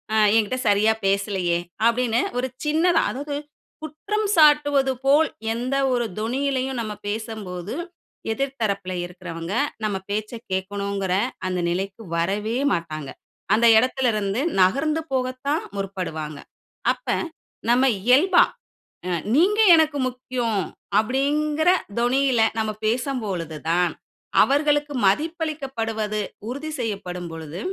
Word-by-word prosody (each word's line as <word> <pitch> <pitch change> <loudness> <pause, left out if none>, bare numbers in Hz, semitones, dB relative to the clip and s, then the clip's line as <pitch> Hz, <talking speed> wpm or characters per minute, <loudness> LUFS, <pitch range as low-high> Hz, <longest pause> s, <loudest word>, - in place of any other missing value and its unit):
ம் 215 -1 +5
என்கிட்டே 225 +4 0
சரியா 210 +2 +4
பேசலையே? 195 -3 +1 0.3
அப்படின்னு 235 0 +2 0.2
ஒரு 255 - 0 0.2
சின்ன 310 +3 +2 0.2
அதாவது 285 +2 -3 0.5
குற்றம் 405 +8 -2
சாட்டுவது 290 -4 +5
போல், 295 +4 +5 0.3
எந்த 250 +4 -2 0.2
ஒரு 240 -1 +1
தொனியிலயும் 265 +2 -1
நம்ம 215 -2 -4
பேசம்போது, 205 -4 -5 0.6
எதிர் 275 +2 -3
தரப்பில 200 -3 -1
இருக்கிறவங்க 175 -1 -7 0.3
நம்ம 205 -2 -1
பேச்சை 215 +3 -3 0.2
கேட்கணுங்கிற, 195 0 -2 0.3
அந்த 185 -1 -1
நிலைக்கு 195 +4 -3
வரவே 205 +7 0 0.2
மாட்டாங்க. 155 -5 -4 0.5
அந்த 230 +2 +3
இடத்திலிருந்து 225 -4 +1 0.2
நகர்ந்து 280 +12 +2
போகத்தான் 260 +4 -1 0.2
முற்படுவாங்க. 165 -6 -4 0.5
அப்ப, - - -20 0.6
நம்ம 250 +2 +4 0.2
இயல்பா, 290 - +5 0.6
அ - - -2 0.3
"நீங்க 390 +8 +3 0.2
எனக்கு 310 -2 +2
முக்கியம்." 245 -5 -2 0.4
அப்படிங்கிற 295 +7 +1 0.3
தொனியில 255 0 +2 0.2
நம்ம 220 -1 0 0.2
பேசும்பொழுது 215 - -2
தான் 175 +1 +2 0.5
அவர்களுக்கு 290 +1 +2
மதிப்பளிக்கப்படுவது 265 - -1 0.3
உறுதி 285 +5 -5
செய்யப்படும் 180 -6 -4
பொழுது, 160 +1 -7
230 Hz, 105 wpm, -23 LUFS, 195-275 Hz, 0.6 s, ம்